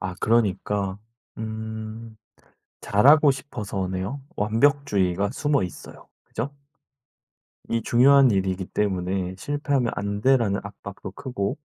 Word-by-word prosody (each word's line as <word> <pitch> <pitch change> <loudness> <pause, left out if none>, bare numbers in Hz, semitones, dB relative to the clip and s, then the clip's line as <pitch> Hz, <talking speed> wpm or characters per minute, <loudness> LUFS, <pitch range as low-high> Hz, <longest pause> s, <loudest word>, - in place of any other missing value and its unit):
아 95 -1 -4
그러니까 100 -3 +1 0.4
음 110 0 -6 0.7
잘하고 140 +8 +5
싶어서네요. 100 -2 -4 0.2
완벽주의가 105 -4 +2
숨어있어요. 140 - -2 0.2
그죠? 125 +6 -4 1.2
이 115 0 0
중요한 135 +2 +5
일이기 95 -1 0
때문에 95 -2 -2
'실패하면 145 -2 -1
안 100 +1 -3
돼.'라는 115 -7 +3
압박도 100 -1 -9
크고 125 +1 -3
105 Hz, 250 characters per minute, -24 LUFS, 95-130 Hz, 1.2 s, 잘하고